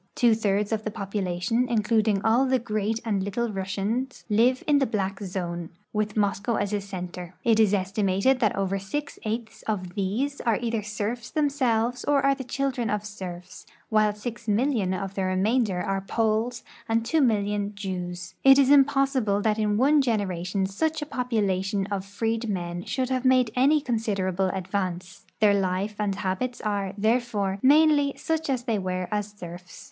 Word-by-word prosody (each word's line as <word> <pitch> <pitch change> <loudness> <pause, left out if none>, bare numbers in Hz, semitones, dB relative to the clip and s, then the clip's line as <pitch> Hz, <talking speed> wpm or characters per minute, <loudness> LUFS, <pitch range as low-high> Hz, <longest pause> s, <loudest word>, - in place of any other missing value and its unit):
Two 240 -2 +4
thirds 205 -1 0
of 220 -1 -1
the 215 - -2
population, 200 +2 -1
including 215 -2 +1
all 240 +4 +4
the 260 0 +3
Great 215 -2 -2
and 205 -4 0
Little 215 +4 -2
Russians, 205 +7 -3
live 240 +5 +3
in 290 -1 +4
the 270 - +2
black 195 -3 -2
zone, 175 -3 -4 0.2
with 210 0 -1
Moscow 205 +2 +1
as 205 0 -1
a 205 - 0
center. 180 -2 -7
It 225 -2 +3
is 215 -3 +5
estimated 195 +5 +1
that 215 -5 +2
over 195 0 -1
six 280 +9 -5
eighths 220 +1 -4
of 185 -5 -2
these 220 +9 -2
are 230 -3 +1
either 230 -2 -1
serfs 215 +3 -4
them 295 -2 +1
selves 245 -3 0
or 280 -1 +2
are 275 - +5
the 270 -1 -6
children 250 -2 -2
of 210 0 -1
serfs, 180 -4 -8 0.2
while 215 -1 +3
6,000,000 225 0 -1
of 195 -1 -5
the 195 - -2
re 185 0 0
mainder 205 -2 +1
are 195 0 -1
Poles 220 +3 0 0.3
and 225 0 +2
2,000,000 210 -8 +1
.Jews. 180 -3 -5
It 270 0 +8
is 275 -1 +5
impossible 270 -6 +3
that 215 0 +1
in 210 -1 +1
one 285 +5 +4
generation 195 -5 -1
such 310 +11 -1
a 295 - -11
population 200 -5 0
of 195 -1 -2
freedmen 200 -4 -3
should 255 -1 -1
have 255 -1 0
made 255 -3 +4
any 280 +5 +4
considerable 195 -7 -1
advance. 185 -1 -4
Their 210 -1 +6
life 195 +2 -1
and 205 -2 0
habits 200 +6 -2
are, 200 -2 -2
therefore, 215 -3 0
mainly 290 0 +5
such 320 -1 -2
as 255 -3 0
they 230 -4 0
were 185 -1 -2
as 205 0 -2
serfs. 175 -1 -10
210 Hz, 170 wpm, -26 LUFS, 195-245 Hz, 0.3 s, It